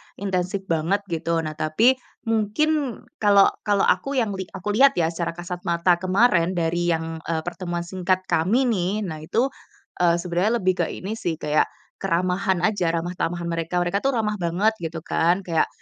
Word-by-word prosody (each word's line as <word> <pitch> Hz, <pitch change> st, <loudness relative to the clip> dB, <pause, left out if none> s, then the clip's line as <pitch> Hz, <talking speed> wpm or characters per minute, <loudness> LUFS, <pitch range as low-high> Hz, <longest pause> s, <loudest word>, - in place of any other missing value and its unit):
intensif 190 Hz, 0 st, -2 dB
banget 170 Hz, +6 st, +1 dB
gitu. 165 Hz, 0 st, -1 dB
Nah 155 Hz, -, -3 dB
tapi, 215 Hz, -, +2 dB, 0.2 s
mungkin 235 Hz, +6 st, 0 dB, 0.2 s
kalau 200 Hz, -2 st, +5 dB, 0.2 s
kalau 205 Hz, -1 st, +3 dB
aku 275 Hz, 0 st, +1 dB
yang 225 Hz, -5 st, +1 dB
li 190 Hz, -1 st, -5 dB
aku 200 Hz, +3 st, -3 dB
lihat 275 Hz, +5 st, +5 dB
ya, 165 Hz, -1 st, +1 dB
secara 170 Hz, 0 st, -3 dB
kasat 175 Hz, +1 st, -7 dB
mata 170 Hz, +1 st, +2 dB
kemarin, 185 Hz, -2 st, +3 dB
dari 175 Hz, +1 st, 0 dB
yang, 160 Hz, 0 st, -5 dB
eee, 160 Hz, -1 st, -1 dB
pertemuan 175 Hz, -1 st, -4 dB
singkat 185 Hz, +1 st, -1 dB
kami 190 Hz, +10 st, +2 dB
nih. 210 Hz, -2 st, 0 dB
Nah 160 Hz, -5 st, -5 dB
itu, 235 Hz, -, 0 dB, 0.5 s
eee, 170 Hz, -1 st, +4 dB
sebenarnya 180 Hz, +6 st, 0 dB
lebih 185 Hz, 0 st, +1 dB
ke -, -, +3 dB
ini 195 Hz, -, -6 dB
sih, 165 Hz, -2 st, -1 dB
kayak 150 Hz, -1 st, +1 dB, 0.3 s
keramahan 185 Hz, 0 st, 0 dB
aja, 185 Hz, -3 st, +1 dB
ramah 170 Hz, +2 st, -2 dB
tamahan 170 Hz, 0 st, -2 dB
mereka, 165 Hz, +2 st, -1 dB
mereka 185 Hz, +3 st, 0 dB
tuh 270 Hz, +1 st, 0 dB
ramah 210 Hz, -2 st, -1 dB
banget 180 Hz, +5 st, +2 dB
gitu 165 Hz, -1 st, -5 dB
kan, 175 Hz, +4 st, +1 dB
kayak 165 Hz, -3 st, +1 dB
180 Hz, 175 wpm, -23 LUFS, 170-205 Hz, 0.5 s, kalau